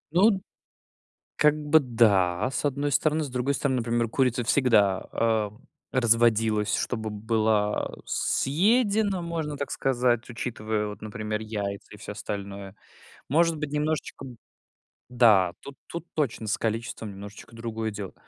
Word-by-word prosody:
Ну 195 Hz, +1 st, +4 dB, 0.9 s
как 150 Hz, -1 st, +4 dB
бы, 155 Hz, +2 st, +6 dB
да, 110 Hz, -6 st, +2 dB
с -, -, -3 dB
одной 145 Hz, 0 st, 0 dB
стороны. 155 Hz, +1 st, +2 dB
С 140 Hz, -, -7 dB
другой 125 Hz, +2 st, -1 dB
стороны, 135 Hz, -1 st, 0 dB
например, 115 Hz, 0 st, 0 dB
курица 125 Hz, 0 st, +1 dB
всегда, 105 Hz, -8 st, +3 dB
а, 110 Hz, -2 st, +1 dB, 0.4 s
разводилась, 115 Hz, -3 st, +3 dB
чтобы 110 Hz, -3 st, -2 dB
была 110 Hz, -1 st, 0 dB
съедена, 200 Hz, -, +1 dB
можно 160 Hz, -4 st, -3 dB
так 140 Hz, -, -4 dB
сказать, 120 Hz, -3 st, +1 dB
учитывая 110 Hz, -3 st, -3 dB
вот, 105 Hz, -, -8 dB
например, 105 Hz, -1 st, -4 dB
яйца 100 Hz, -2 st, -5 dB
и -, -, -11 dB
всё -, -, -7 dB
остальное. 100 Hz, -1 st, -6 dB, 0.5 s
Может 165 Hz, +2 st, +3 dB
быть, 150 Hz, -1 st, -4 dB
немножечко 150 Hz, -2 st, -2 dB, 0.8 s
Да, 110 Hz, -8 st, +4 dB
тут 140 Hz, -, -10 dB
тут 170 Hz, 0 st, -6 dB
точно 130 Hz, -7 st, -1 dB
с 105 Hz, -, 0 dB
количеством 115 Hz, -1 st, -3 dB
немножечко 100 Hz, +3 st, -11 dB
другое 115 Hz, -1 st, -3 dB
дело. 100 Hz, -2 st, -7 dB
115 Hz, 130 wpm, -26 LUFS, 105-145 Hz, 0.9 s, бы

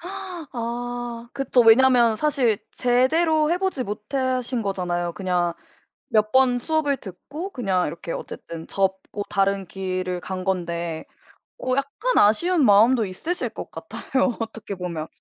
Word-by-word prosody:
아 245 Hz, -10 st, -5 dB
그쵸. 270 Hz, -2 st, +2 dB
왜냐하면 235 Hz, 0 st, +6 dB
사실 260 Hz, -7 st, +1 dB, 0.2 s
제대로 305 Hz, +6 st, +3 dB
해 350 Hz, -, +2 dB
보지 380 Hz, -8 st, -1 dB
못하신 250 Hz, +3 st, -2 dB
거잖아요. 175 Hz, -3 st, -2 dB
그냥 180 Hz, -2 st, 0 dB, 0.6 s
몇 215 Hz, -1 st, +2 dB
번 260 Hz, -1 st, +4 dB
수업을 295 Hz, 0 st, 0 dB
듣고 285 Hz, -, -7 dB
그냥 190 Hz, -, 0 dB
이렇게 165 Hz, +2 st, -6 dB
어쨌든 165 Hz, -1 st, -7 dB
접고 195 Hz, +1 st, -1 dB
다른 195 Hz, -1 st, +1 dB
길을 185 Hz, -1 st, -3 dB
간 185 Hz, 0 st, -5 dB
건데 170 Hz, -3 st, -2 dB, 0.5 s
어 255 Hz, 0 st, 0 dB
약간 280 Hz, -, -1 dB
아쉬운 300 Hz, -, +4 dB
마음도 220 Hz, +3 st, +5 dB
있으실 315 Hz, -, -3 dB
것 -, -, -8 dB
같아요, 265 Hz, -2 st, -1 dB
어떻게 225 Hz, -3 st, -5 dB
보면. 170 Hz, -3 st, -4 dB
230 Hz, 270 characters per minute, -24 LUFS, 190-270 Hz, 0.6 s, 왜냐하면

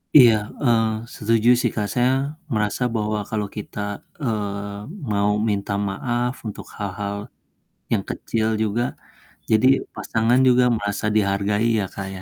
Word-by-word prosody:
Iya, 120 Hz, -5 st, +9 dB, 0.3 s
eee, 115 Hz, -3 st, +4 dB, 0.3 s
setuju 115 Hz, +2 st, +2 dB
sih 120 Hz, -, +1 dB
Kak 105 Hz, -2 st, 0 dB
saya 125 Hz, +1 st, +3 dB, 0.4 s
merasa 105 Hz, +2 st, 0 dB
bahwa 105 Hz, 0 st, 0 dB
kalau 105 Hz, -2 st, -1 dB
kita, 105 Hz, -, -6 dB, 0.4 s
eee, 100 Hz, -3 st, -2 dB, 0.3 s
mau 100 Hz, 0 st, +2 dB, 0.2 s
minta 100 Hz, 0 st, -1 dB, 0.2 s
maaf 120 Hz, +5 st, -1 dB
untuk 105 Hz, -, -7 dB
hal-hal 100 Hz, 0 st, -3 dB, 0.8 s
yang -, -, +2 dB
kecil 110 Hz, -1 st, -1 dB, 0.2 s
juga 110 Hz, +3 st, 0 dB, 0.7 s
jadi 110 Hz, +3 st, +5 dB, 0.3 s
pasangan 115 Hz, +3 st, +2 dB
juga 125 Hz, 0 st, +5 dB
merasa 100 Hz, +1 st, -3 dB
dihargai 100 Hz, +2 st, +2 dB
ya 100 Hz, -, 0 dB
Kak 95 Hz, -1 st, -5 dB
ya. 95 Hz, -, -8 dB
105 Hz, 135 wpm, -23 LUFS, 100-115 Hz, 0.8 s, Iya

